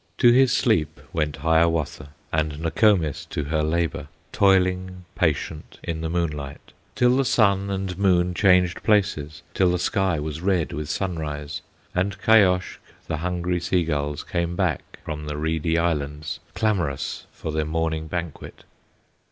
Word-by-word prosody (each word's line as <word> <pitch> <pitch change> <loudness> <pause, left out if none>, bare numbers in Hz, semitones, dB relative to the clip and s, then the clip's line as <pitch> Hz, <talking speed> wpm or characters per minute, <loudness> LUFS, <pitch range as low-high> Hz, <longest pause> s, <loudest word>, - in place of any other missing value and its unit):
To 120 - +6
his 130 +1 +5
sleep 80 - +1
went 75 -2 -1
Hiawatha, 80 -1 +1 0.2
And 75 -1 0
Nokomis 85 - +2
to 75 - -4
her 75 +2 0
labor, 80 -1 -1 0.2
Toiling 95 -2 +2
patient 80 -3 -2
in 80 -1 -3
the 80 - -2
moonlight, 75 -5 -4 0.2
Till 125 0 +4
the 135 - +3
sun 100 -5 +2
and 95 -1 -3
moon 90 -2 +3
changed 90 -2 +3
places, 95 -9 +1
Till 95 -2 +3
the 90 - +1
sky 95 -2 0
was 75 +1 -4
red 90 -3 0
with 75 0 -4
sunrise, 75 -6 -3 0.3
And 95 +2 -1
Kayoshk, 95 -3 +3 0.3
the 80 - -3
hungry 90 +1 -1
sea 90 +1 +1
gulls, 75 -2 -2
Came 85 0 -2
back - - -2
from 75 -1 -5
the 75 0 -4
reedy 80 +1 0
islands, 75 -3 -2 0.2
Clamorous 90 -9 -1
for 80 - -6
their 80 0 0
morning 80 0 -2
banquet. 85 -2 -6
85 Hz, 145 wpm, -24 LUFS, 75-95 Hz, 0.3 s, To